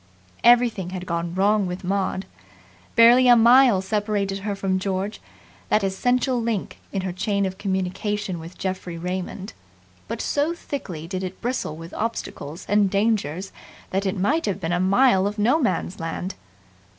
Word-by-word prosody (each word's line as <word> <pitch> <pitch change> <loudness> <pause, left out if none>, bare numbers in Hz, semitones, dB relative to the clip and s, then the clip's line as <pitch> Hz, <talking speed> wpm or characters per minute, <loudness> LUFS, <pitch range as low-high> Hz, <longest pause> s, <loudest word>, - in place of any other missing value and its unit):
Everything 235 -6 +4
had 185 0 -6
gone 170 0 -3
wrong 200 +1 +2
with 180 +2 -5
Maud. 190 0 -1 0.7
Barely 240 +2 +7
a 245 - +8
mile 235 -3 +6
separated 205 -1 -1
her 200 0 -3
from 195 -1 -1
George, 195 +2 -3 0.5
that 210 - +3
essential 245 +6 +1
link 225 -4 -3
in 195 - -2
her 185 - -2
chain 200 +1 0
of 190 0 -5
communication 190 0 -2
with 165 +2 -10
Geoffrey 185 -2 -4
Raymond; 185 +3 -5 0.5
but - - -4
so 300 +4 0
thickly 185 - -6
did 185 +2 -4
it 185 0 -6
bristle 240 -11 -3
with 165 +2 -10
obstacles 180 -8 -4
and 205 -1 +3
dangers 195 -4 0 0.4
that 195 +1 0
it 190 - -1
might 275 - +1
have 200 -2 -1
been 165 -3 -3
a 175 - +1
mile 195 +1 +4
of 210 +1 -4
No 240 +9 +3
Man's 240 - -1
Land. 165 +3 -4
195 Hz, 160 wpm, -23 LUFS, 185-225 Hz, 0.7 s, a